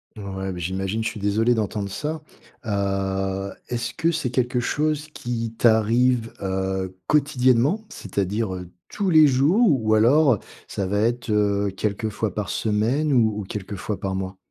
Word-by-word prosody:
Ouais, 95 -2 -5
beh 90 - -6
j'imagine, 95 +5 -2
je - - -1
suis 110 - -8
désolé 110 +4 +2
d'entendre 105 -2 -2
ça. 155 +8 -4 0.5
Heu, 95 -1 -1 0.2
est-ce 120 -1 -3
que 165 - +1
c'est 160 -6 -1
quelque 125 0 0
chose 150 +4 -1
qui 115 -4 -4
t'arrive, 115 +1 +3
heu, 95 -1 -2
quotidiennement? 140 - +2
C'est-à-dire, 100 - -2
heu, 90 -1 -7 0.2
tous 200 -2 -1
les 155 -3 +7
jours, 145 - +4 0.2
ou 110 0 +3
alors 125 +2 +4 0.3
ça 100 - -3
va 100 +2 0
être, 120 +1 0
heu, 100 -1 +1
quelquefois 105 +1 -2
par 105 -2 -3
semaine 115 +8 0
ou 110 -5 +3
ou - - -3
quelquefois 100 +1 -5
par 95 -1 -3
mois? 95 0 -4
110 Hz, 155 wpm, -23 LUFS, 100-125 Hz, 0.5 s, les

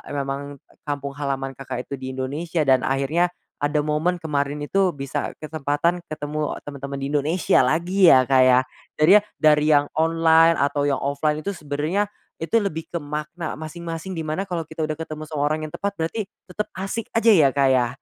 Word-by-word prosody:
memang 140 +1 -4 0.3
kampung 140 -1 -3
halaman 135 -1 -2
Kakak 130 -1 -6
itu 140 -2 -7
di 130 0 -6
Indonesia 155 +5 -2
dan 130 -2 +4
akhirnya 140 +6 +1 0.4
ada 150 +1 +1
momen 155 +4 0
kemarin 145 -2 -2
itu 185 +5 +1
bisa 140 0 -4
kesempatan 155 +3 -1
ketemu 150 0 -3 0.2
temen-temen 140 -1 -6
di 135 - -3
Indonesia 150 +3 +2
lagi 175 +6 +4
ya 130 -1 +5
Kak 130 -1 +5
ya, 130 0 +6 0.4
jadi 155 +4 +5
ya - - -11 0.2
dari 150 -1 +4
yang 145 0 +4
online 165 +1 +4
atau 145 0 +1
yang 140 -1 +1
offline 150 +2 0
itu 200 +5 -4
sebenernya, 150 +7 -1 0.4
itu 230 +7 +2
lebih 165 -6 -3
ke 170 - -2
makna 150 +3 -5
masing-masing 165 +3 -6
dimana 155 +4 -2
kalau 170 -5 -4
kita 160 0 -4
udah 155 0 -3
ketemu 155 -1 -6
seorang 155 +1 0
yang 155 - -6
tepat 200 0 -3
berarti 190 +6 -3 0.2
tetep 210 +3 -4
asik 195 +4 -4
aja 230 0 +5
ya 155 -8 +6
Kak 140 -1 +4
ya, 125 -2 +3
150 Hz, 175 wpm, -23 LUFS, 140-165 Hz, 0.4 s, ya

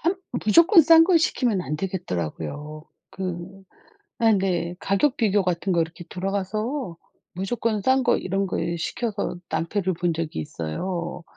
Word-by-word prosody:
함 345 +4 +1 0.3
무조건 335 - +7
싼 325 +2 +7
거 355 -1 +4
시키면 245 - +1
안 150 -3 -3
되겠더라고요. 150 - -4 0.3
그 185 +1 -6 0.6
아 225 -1 +5
네. 185 -4 0
가격 255 +8 +1
비교 205 -3 +2
같은 180 +1 -1
거 170 - +3
이렇게 165 +1 -5
들어가서 200 - -3 0.4
무조건 215 +3 -1
싼 260 +3 +3
거 - - +3
이런 195 +1 -1
거 - - -2 0.2
시켜서 205 +2 -3
낭패를 175 +4 -1
본 175 0 0
적이 160 - -4
있어요. 170 - -4
190 Hz, 280 characters per minute, -24 LUFS, 170-220 Hz, 0.6 s, 무조건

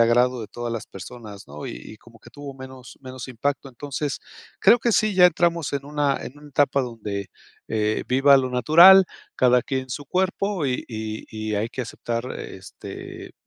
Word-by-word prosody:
agrado 120 +2 +3
de 110 - -7
todas 120 +1 -5
las 115 - -5
personas, 105 0 -10
¿no? 75 +2 -8
Y - - -5 0.2
y 110 - -12
como 115 -1 -19
que 120 - -16
tuvo 140 +2 -9
menos 130 -1 -12
menos 130 -1 -8
impacto, 135 +3 -3
entonces, 140 +2 -4 0.4
creo 240 - +6
que 235 - +1
sí. 215 -1 +2
ya 180 -1 +8
entramos 170 -3 0
en 140 -1 -3
una 145 -1 0
en 140 - -10
una 150 0 -14
etapa 140 0 +2
donde, 105 -5 -5 0.4
eh, 110 -1 0
viva 135 +2 +6
lo 130 -1 +1
natural 170 +10 +8 0.3
cada 125 -1 +4
quien 130 -1 -2
en 130 - -14
su 145 +4 -5
cuerpo 190 +1 -1
y 125 -1 -2
y 110 -1 -5
y 110 -1 -4
hay 105 +2 -1
que 125 +2 -5
aceptar, 115 +1 -4
este, - - -9
130 Hz, 185 wpm, -23 LUFS, 115-145 Hz, 0.4 s, ya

